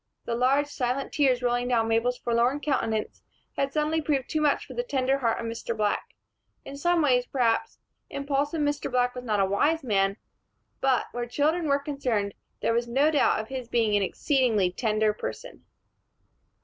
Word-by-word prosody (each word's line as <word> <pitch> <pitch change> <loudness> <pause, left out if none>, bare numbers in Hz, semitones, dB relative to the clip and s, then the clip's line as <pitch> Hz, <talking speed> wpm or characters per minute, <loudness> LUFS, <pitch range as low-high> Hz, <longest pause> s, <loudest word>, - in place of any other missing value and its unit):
The 235 - -2
large 260 +4 +2
silent 270 -1 -2
tears 260 -4 +2
rolling 245 0 +1
down 230 -3 +2
Mabel's 230 +2 +1
forlorn 240 +4 +1
countenance 225 -7 -2 0.3
had 275 0 -1
suddenly 310 +2 0
proved 285 -4 -1
too 310 - 0
much 295 -2 +2
for - - -10
the 485 - -1
tender 270 - 0
heart 230 -4 0
of 230 - -4
Mr. 230 0 -4
Black. 210 -1 -1 0.5
In 275 - -8
some 340 +3 +2
ways, 250 -3 +2
perhaps, 240 -4 0 0.3
impulsive 285 +2 -1
Mr. 290 0 -1
Black 245 -1 +1
was 250 0 -7
not 210 -3 0
a 195 - +4
wise 290 +12 +1
man; 195 -4 +1 0.6
but, 265 -2 +2
where 240 0 -4
children 310 +6 0
were 280 -1 +3
concerned, 255 -9 -2 0.3
there - - +1
was 235 +1 0
no 275 +6 +3
doubt 290 -7 +2
of 220 - -12
his 260 -3 -5
being 225 -3 +1
an 205 - +3
exceedingly 220 - +1
tender 215 +1 +1
person. - - -7
250 Hz, 175 wpm, -26 LUFS, 230-285 Hz, 0.6 s, a